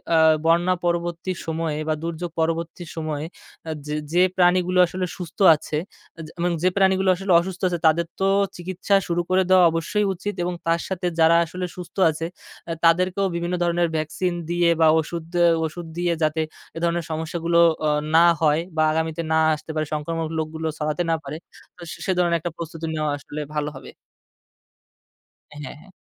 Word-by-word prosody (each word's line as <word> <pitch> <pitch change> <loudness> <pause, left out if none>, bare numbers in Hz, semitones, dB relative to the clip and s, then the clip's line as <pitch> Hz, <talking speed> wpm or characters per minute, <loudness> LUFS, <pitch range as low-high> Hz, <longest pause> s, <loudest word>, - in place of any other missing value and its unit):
আ - - +5 0.3
বন্যা 175 +2 +3
পরবর্তী 170 +1 -1
সময়ে 160 -2 -2
বা 155 - +2
দুর্যোগ 170 +1 -4
পরবর্তী 165 +2 -2
সময়ে 155 -2 -3 0.6
যে, 150 - -4 0.2
যে 175 - +3 0.2
প্রাণীগুলো 180 0 +3
আসলে 185 +1 -3
সুস্থ 180 +2 -9 0.2
আছে 150 0 -4 0.6
এবং 175 0 +1
যে 185 - +5
প্রাণীগুলো 190 -1 +3
আসলে 195 +1 -3
অসুস্থ 180 +1 -5
আছে, 175 - -1
তাদের 170 +2 +3
তো 190 - +1 0.3
চিকিৎসা 185 +3 -1
শুরু 175 0 0
করে 185 +1 +3
দেওয়া 185 -1 +6
অবশ্যই 200 +6 0
উচিত 205 +3 -5
এবং 180 0 -2
তার 165 +1 +2
সাথে 185 -2 -4
যারা 165 +1 +6
আসলে 180 +2 -5
সুস্থ 180 -2 -10 0.2
আছে, 160 +2 -5 0.4
আ - - -2
তাদেরকেও 185 +3 +3
বিভিন্ন 170 +1 -2
ধরনের 175 0 +1
ভ্যাকসিন 155 +4 -1 0.2
দিয়ে 175 0 +2
বা 160 - +6
ওষুধ 160 +1 -4 0.4
ওষুধ 165 +2 -6
দিয়ে 175 -1 +1
যাতে 155 +1 +1 0.4
এ - - -3
ধরনের 170 -1 0
সমস্যাগুলো, 165 +1 -1 0.3
আ - - +3 0.3
না 170 +1 +7 0.2
হয় 155 +1 +3 0.2
বা 155 - +4
আগামীতে 160 0 -1 0.2
না 160 - +4 0.2
আসতে 155 +1 -9
পারে, 155 0 0
সংক্রামক 160 +2 -2
রোগগুলো 160 +1 -3
ছড়াতে 155 +3 -1
না 165 - +3
পারে, 145 +3 -6 0.4
তো - - -15 0.2
সে 190 - +1
ধরনের 170 -1 +2
একটা 175 +1 -4
প্রস্তুতি 165 0 -6
নেওয়া 155 -1 -1
আসলে 150 +1 -7
ভালো 150 0 -1
হবে। - - -10 1.7
হ্যাঁ, 145 -1 -7
হ্যাঁ। 190 - -18
170 Hz, 170 wpm, -23 LUFS, 160-180 Hz, 1.7 s, না